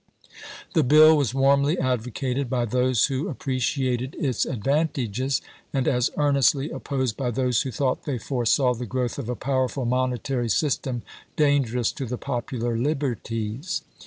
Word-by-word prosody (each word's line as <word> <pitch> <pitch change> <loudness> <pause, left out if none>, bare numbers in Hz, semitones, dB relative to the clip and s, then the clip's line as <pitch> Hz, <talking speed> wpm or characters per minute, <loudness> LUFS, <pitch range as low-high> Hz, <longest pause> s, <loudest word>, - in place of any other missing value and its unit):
The 165 - +4
bill 155 +3 +7
was 135 -4 0
warmly 140 +4 +3
advocated 125 +1 -1
by 125 -2 0
those 125 0 +2
who 135 +1 -2
ap - - -6
preciated 130 0 -1
its 130 -6 -1
advantages, 135 0 -1 0.3
and 135 -2 0
as 125 -2 +2
earnestly 140 0 +2
opposed 130 -5 -2
by 125 0 -2
those 125 0 +1
who 135 - -3
thought 130 +1 -1
they 140 -4 -2
foresaw 125 +1 +1
the 120 0 -6
growth 125 +2 -2
of 125 -4 -5
a 125 - -1
powerful 130 0 -1
monetary 125 0 -1
system 125 +2 0 0.3
dangerous 135 -6 +2
to 135 - -5
the 125 +2 -3
pop 125 -3 -3
ular 120 -2 -1
liberties. 130 - -2
130 Hz, 150 wpm, -24 LUFS, 120-140 Hz, 0.3 s, bill